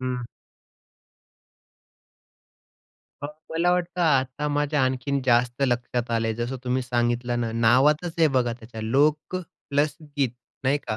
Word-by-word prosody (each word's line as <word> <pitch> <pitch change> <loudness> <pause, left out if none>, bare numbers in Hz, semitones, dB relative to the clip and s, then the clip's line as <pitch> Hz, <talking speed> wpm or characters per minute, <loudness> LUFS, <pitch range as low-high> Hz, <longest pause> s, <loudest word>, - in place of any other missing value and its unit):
हं. 125 -1 -3 3.0
मग 145 - -3 0.2
मला 170 +2 +2
वाटतं 180 0 -1
आता 140 -2 +1
माझ्या 145 0 +1
आणखीन 130 +2 0
जास्त 120 +1 +2
लक्षात 120 -1 -1
आलंय. 115 -1 +1
जसं 120 +3 -3
तुम्ही 125 +1 0
सांगितलं 120 0 0
ना, 115 -1 -1
नावातच 135 +9 +3
आहे 160 -2 +5
बघा 120 -2 +2
त्याच्या. 115 -1 -10
लोकं 150 +9 +1 0.3
प्लस 145 +1 +1 0.2
गीत 135 -4 +2 0.3
नाही 140 +3 +3
का. 110 - -2
130 Hz, 125 wpm, -25 LUFS, 120-145 Hz, 3.0 s, आहे